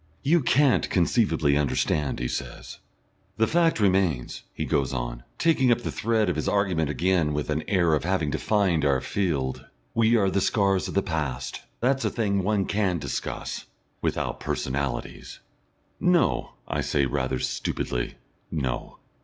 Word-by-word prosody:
"You 165 Hz, +4 st, +4 dB
can't 135 Hz, +1 st, +3 dB
conceivably 80 Hz, -, +2 dB
understand," 75 Hz, 0 st, 0 dB
he 60 Hz, -, -2 dB
says. -, -, -6 dB, 0.6 s
"The 110 Hz, -, +4 dB
fact 165 Hz, 0 st, +2 dB
remains," 95 Hz, -, +1 dB
he -, -, -4 dB
goes 70 Hz, -1 st, 0 dB
on, -, -, -3 dB, 0.2 s
taking 140 Hz, -7 st, +3 dB
up 120 Hz, -, +2 dB
the -, -, -3 dB
thread 110 Hz, -1 st, +1 dB
of -, -, 0 dB
his -, -, -1 dB
argument 90 Hz, -7 st, +1 dB
again 85 Hz, -1 st, +1 dB
with 75 Hz, +1 st, -2 dB
an 75 Hz, +1 st, -1 dB
air 85 Hz, -5 st, +3 dB
of 75 Hz, -, +1 dB
having 90 Hz, -4 st, 0 dB
defined 95 Hz, -3 st, +1 dB
our 70 Hz, -2 st, +3 dB
field, 75 Hz, -10 st, -1 dB, 0.3 s
"we 115 Hz, +1 st, +4 dB
are 100 Hz, -3 st, +2 dB
the 100 Hz, -, +1 dB
scars 95 Hz, -1 st, +2 dB
of -, -, -6 dB
the 100 Hz, -, +3 dB
past. 75 Hz, -8 st, -3 dB, 0.2 s
That's 135 Hz, +2 st, +2 dB
a -, -, +2 dB
thing 100 Hz, -4 st, 0 dB
one 100 Hz, 0 st, +1 dB
can 100 Hz, -3 st, 0 dB
discuss 70 Hz, -4 st, -4 dB, 0.3 s
without -, -, -1 dB
personalities." 65 Hz, -2 st, -3 dB, 0.6 s
"No," 180 Hz, -2 st, +2 dB
I -, -, -1 dB
say 70 Hz, -2 st, +1 dB
rather 65 Hz, -1 st, -1 dB
stupidly, -, -, -2 dB, 0.3 s
"no." 65 Hz, -6 st, -3 dB
90 Hz, 155 wpm, -26 LUFS, 70-105 Hz, 0.6 s, You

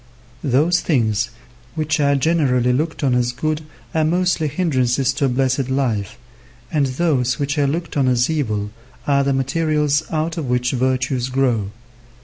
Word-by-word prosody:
Those 150 Hz, +6 st, +3 dB
things 110 Hz, -8 st, +1 dB, 0.5 s
which 155 Hz, -1 st, 0 dB
are 140 Hz, -1 st, +3 dB
generally 130 Hz, -5 st, +2 dB
looked 155 Hz, +4 st, -2 dB
on 135 Hz, -3 st, +2 dB
as 125 Hz, 0 st, +1 dB
good 155 Hz, +5 st, -2 dB, 0.3 s
are 160 Hz, -, +2 dB
mostly 175 Hz, 0 st, +1 dB
hindrances 135 Hz, -5 st, +1 dB
to 140 Hz, 0 st, 0 dB
a -, -, +2 dB
blessed 130 Hz, +1 st, 0 dB
life, 120 Hz, -7 st, -1 dB, 0.5 s
and 145 Hz, -4 st, +2 dB
those 130 Hz, -3 st, 0 dB
which 145 Hz, 0 st, -1 dB
are 140 Hz, -, +3 dB
looked 165 Hz, +4 st, -3 dB
on 135 Hz, -3 st, +2 dB
as 125 Hz, -1 st, +3 dB
evil 110 Hz, -10 st, -2 dB, 0.3 s
are 140 Hz, -1 st, +3 dB
the 140 Hz, -, +1 dB
materials 150 Hz, +2 st, +1 dB
out 160 Hz, +1 st, -2 dB
of 155 Hz, -5 st, -3 dB
which 125 Hz, 0 st, +1 dB
virtues 130 Hz, 0 st, 0 dB
grow. 125 Hz, -6 st, +1 dB
135 Hz, 155 wpm, -20 LUFS, 125-155 Hz, 0.5 s, Those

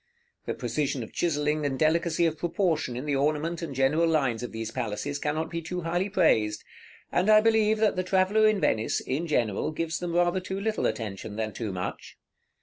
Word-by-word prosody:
The -, -, -2 dB
precision 130 Hz, +2 st, -2 dB
of -, -, -11 dB
chiselling 150 Hz, -2 st, 0 dB
and 135 Hz, -2 st, -1 dB
delicacy 165 Hz, +2 st, +2 dB
of 160 Hz, -1 st, +1 dB
proportion 165 Hz, -7 st, 0 dB
in 130 Hz, -, -5 dB
the 145 Hz, -2 st, 0 dB
ornament 155 Hz, +4 st, 0 dB
and 155 Hz, -5 st, -5 dB
general 145 Hz, +6 st, +3 dB
lines 135 Hz, -8 st, +1 dB
of 125 Hz, -, -5 dB
these 115 Hz, 0 st, -5 dB
palaces 120 Hz, +6 st, -3 dB
cannot 155 Hz, +2 st, -2 dB
be 170 Hz, -1 st, -3 dB
too 180 Hz, +2 st, -4 dB
highly 175 Hz, +4 st, -1 dB
praised; 110 Hz, -, +2 dB, 0.5 s
and 180 Hz, +4 st, +1 dB
I 215 Hz, 0 st, +8 dB
believe 220 Hz, -1 st, +3 dB
that 215 Hz, -1 st, +2 dB
the 185 Hz, -, 0 dB
traveller 190 Hz, +4 st, +3 dB
in 215 Hz, -2 st, +2 dB
Venice, 110 Hz, -10 st, +1 dB
in 150 Hz, +6 st, -3 dB
general, 115 Hz, -9 st, 0 dB
gives 160 Hz, +1 st, -3 dB
them 175 Hz, -1 st, -3 dB
rather 175 Hz, +1 st, +2 dB
too 190 Hz, +1 st, -5 dB
little 220 Hz, +2 st, 0 dB
attention 105 Hz, -2 st, -5 dB
than 110 Hz, -1 st, -3 dB
too 110 Hz, -4 st, -4 dB
much. 90 Hz, -1 st, -6 dB
155 Hz, 195 wpm, -27 LUFS, 130-180 Hz, 0.5 s, I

